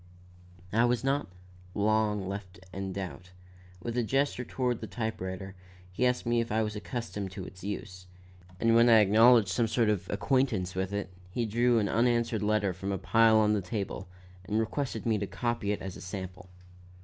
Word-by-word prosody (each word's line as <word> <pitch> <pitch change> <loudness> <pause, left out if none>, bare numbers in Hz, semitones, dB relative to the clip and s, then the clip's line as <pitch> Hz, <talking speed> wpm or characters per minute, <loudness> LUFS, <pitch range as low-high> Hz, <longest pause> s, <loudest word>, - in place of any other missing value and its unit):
I 115 +2 +4
was 120 +1 +1
not 135 -3 0 0.5
long 105 -1 +1
left 95 -1 -6
in 95 0 -4
doubt. 95 -1 -6 0.5
With 115 - -3
a 125 - +2
gesture 135 +2 0
toward 125 -1 -2
the - - -5
type 110 -4 -4
writer, 95 +1 -5 0.4
he 125 +7 +1
asked 125 0 -1
me 120 0 +2
if 115 - -5
I 110 +1 +2
was 105 0 -3
accustomed 105 -3 -4
to 95 -1 -6
its 95 -1 -12
use; 90 -2 -6 0.5
and 115 0 +3
when 115 +1 +6
I 115 - +8
acknowledged 110 +1 +6
some 115 +5 +1
sort 115 0 +2
of 105 -4 -1
acquaintance 110 -4 0
with 95 +1 -2
it, 100 -2 -4 0.2
he 115 +6 -1
drew 120 +2 +2
an 105 -2 +2
unanswered 115 0 +1
letter 105 -2 +1
from 95 +3 -4
a 95 - -1
pile 110 +5 +4
on 105 -1 +4
the 105 - +1
table 100 0 -4 0.4
and 105 +3 0
requested 115 +1 -2
me 110 -3 +2
to 100 - -3
copy 120 -3 -2
it 105 - -3
as 95 -1 -6
a - - -10
sample. 95 -1 -7
105 Hz, 190 wpm, -29 LUFS, 95-115 Hz, 0.5 s, I